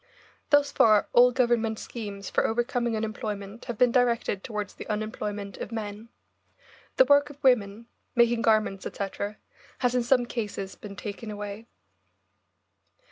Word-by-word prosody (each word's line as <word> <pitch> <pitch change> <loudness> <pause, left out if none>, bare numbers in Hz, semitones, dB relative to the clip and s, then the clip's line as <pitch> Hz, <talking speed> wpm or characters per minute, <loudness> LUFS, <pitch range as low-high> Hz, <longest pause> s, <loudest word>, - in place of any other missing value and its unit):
Thus 290 -1 +4
far 215 -6 +4
all 245 +1 +7
Government 235 -3 +1
schemes 205 -5 -7
for - - +1
overcoming 240 0 0
unemployment 215 -1 -5
have 240 -4 -5
been 250 +1 +4
directed 235 -5 +1
towards 210 -2 -4
the - - -9
unemployment 210 -2 -4
of - - -6
men. 215 0 -6 0.9
The 260 - +7
work 285 +2 +4
of 290 0 -14
women, 225 -4 +2 0.3
making 235 -1 +4
garments, 215 -4 +2
etc., 200 +1 -4 0.4
has 245 -1 +1
in 250 - +2
some 245 +1 +3
cases 205 -5 -4
been 200 -2 -10
taken 210 +3 -6
away. 205 +1 -6
225 Hz, 135 wpm, -27 LUFS, 205-240 Hz, 0.9 s, all